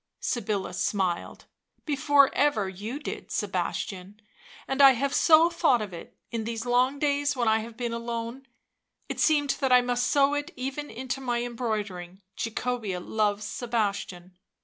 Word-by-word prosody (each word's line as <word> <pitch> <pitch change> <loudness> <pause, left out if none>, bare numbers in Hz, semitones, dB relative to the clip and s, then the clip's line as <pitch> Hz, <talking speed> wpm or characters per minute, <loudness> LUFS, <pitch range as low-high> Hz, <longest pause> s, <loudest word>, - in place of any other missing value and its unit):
Sybilla 210 -6 -2
smiled. 185 -1 -2 0.2
" - - -45
Before 285 -1 +4
ever 275 -9 +2
you 205 +8 -5
did, 295 - -7
Sebastian, 195 +2 -3 0.5
and 270 +1 +1
I 270 -1 +9
have 275 +3 -1
so 330 +1 +6
thought 275 -7 +3
of 210 -4 -5
it, 170 - -10
in 230 -2 -2
these 225 +1 -4
long 250 +3 +2
days 285 0 +1
when 240 -3 0
I 220 0 +4
have 225 +1 -8
been 240 -2 -3
alone, 235 +2 -5 0.6
it - - -4
seemed 290 -3 +3
that 265 -2 0
I 250 0 +7
must 245 0 0
sew 280 0 +3
it 290 0 -2
even 270 +3 -4
into 260 +2 -5
my 245 -2 -1
embroideries 210 -7 -4
— - - -53
' - - -53
Jacobea 230 -4 -2
loves 210 +2 -1
Sebastian. 200 -5 -3
240 Hz, 165 wpm, -27 LUFS, 210-270 Hz, 0.6 s, I